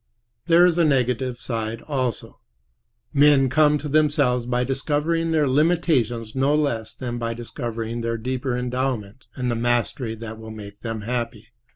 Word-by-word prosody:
There 170 +1 +6
is 175 -1 +2
a - - +5
negative 130 -3 +1
side 115 -1 -4
also. 130 -6 -3 0.7
Men 140 -2 +5
come 150 +2 +4
to 150 +1 -6
themselves 145 -5 +2
by 125 0 +1
discovering 150 +5 0
their 155 -3 +2
limitations 130 -7 +1
no 135 +2 +2
less 120 -8 -1
than 120 -2 -4
by 115 0 -2
discovering 115 -1 -5
their 115 0 -1
deeper 130 +2 -2
endowments 125 -2 -3
and 125 -2 -1
the - - 0
mastery 120 0 0
that 110 0 -8
will 110 0 -9
make 105 -1 -10
them 115 -2 -4
happy. 120 +1 -4
125 Hz, 155 wpm, -23 LUFS, 115-145 Hz, 0.7 s, There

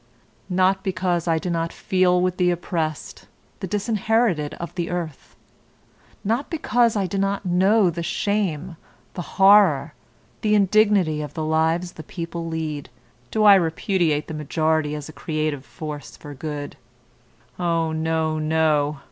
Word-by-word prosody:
Not 190 +1 +2
because 180 -2 -1
I 165 -1 +2
do 175 +2 -3
not 165 0 -1
feel 185 -1 +2
with 180 -1 0
the 180 -1 +3
oppressed, 165 -3 -3 0.3
the 190 - -4
disinherited 210 -5 0
of 170 -2 -7
the 175 -2 -3
earth; 170 -5 -5 0.9
not 230 +7 -1
because 240 -8 +1
I 200 -2 +1
do 195 +2 -2
not 195 0 -1
know 190 +2 +3
the 170 +1 -5
shame, 185 -3 -2 0.4
the 180 - -5 0.2
horror, 190 -7 +5 0.5
the 210 -1 +2
indignity 200 -6 +3
of 150 - -7
the 160 -2 -2
lives 160 +3 +1
the 160 - -10
people 170 -1 -6
lead, 155 -4 -4 0.4
do 215 - 0
I 205 -1 +9
repudiate 165 -3 +1
the - - -6
majority 155 0 0
as 150 -1 -6
a 155 - -10
creative 155 -4 -3
force 145 -5 -8
for 145 - -10
good. 145 0 -6 0.8
Oh, 165 -2 0
no, 160 0 -1
no! 155 -2 +1
170 Hz, 145 wpm, -23 LUFS, 155-190 Hz, 0.9 s, I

